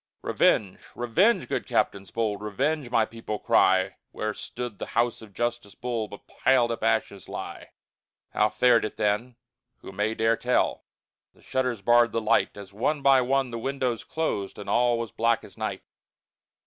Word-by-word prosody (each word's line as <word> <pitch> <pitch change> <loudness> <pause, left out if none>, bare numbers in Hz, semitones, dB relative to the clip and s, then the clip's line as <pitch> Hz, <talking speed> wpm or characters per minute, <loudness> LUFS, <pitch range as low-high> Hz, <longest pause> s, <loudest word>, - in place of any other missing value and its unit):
Revenge, 100 -4 +2 0.2
revenge, 130 - +2
good - - -2
captains 100 -2 0
bold, 105 -2 -2
Revenge, 135 +7 -1
my 115 -2 +3
people 115 -1 -6
cry; 95 -1 +3
Where 110 0 -3
stood 120 -2 -7
the - - -5
house 120 0 +1
of 110 -2 -12
Justice 120 -1 -3
Bull 120 -3 -3
But 100 - -12
piled 125 -3 +2
up 115 - -4
ashes 110 -4 0
lie. - - -7 0.6
How 105 - +2
fared 115 +2 +4
it 110 - -4
then, 105 +4 0 0.5
who - - -9
may 105 +3 -1
dare 115 0 +2
tell? 125 0 0 0.5
The - - -23
shutters 125 -5 -1
barred 120 +1 +4
the 115 - +1
light, 110 -1 +1
As 100 -1 -10
one 140 +7 -1
by 135 -1 +6
one 130 0 +1
the 115 - -4
windows 130 -2 -2
closed, 105 -12 -3
And 105 - -8
all 120 0 +3
was 115 -3 -4
black 115 0 +1
as - - -14
night. - - -4
115 Hz, 170 wpm, -26 LUFS, 105-125 Hz, 0.6 s, by